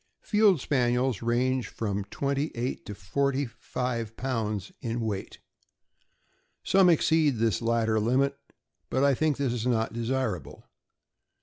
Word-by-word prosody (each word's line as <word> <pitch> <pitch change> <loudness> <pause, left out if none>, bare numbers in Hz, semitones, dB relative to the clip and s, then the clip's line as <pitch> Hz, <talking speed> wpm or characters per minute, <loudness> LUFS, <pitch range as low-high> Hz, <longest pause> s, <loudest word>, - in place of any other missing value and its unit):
Field 210 -5 +4
Spaniels 125 -3 +1
range 125 0 +1
from 100 -3 -3
twenty 140 +7 -1
eight 120 +2 -3
to 105 - -6
forty 140 +3 -1 0.3
live 115 -3 -2
pounds 110 -6 -2
weight. 115 -4 -3 1.3
Some 190 -2 +5
exceed 160 -3 +3
this 110 -5 +1
latter 115 -1 +1
limit, 130 +6 +2 0.5
but 130 - +1
I 140 -1 +5
think 150 +1 +1
this 135 -4 0
is 120 0 -2
not 115 -3 +1
desirable. 115 - -3
125 Hz, 120 wpm, -28 LUFS, 115-140 Hz, 1.3 s, Some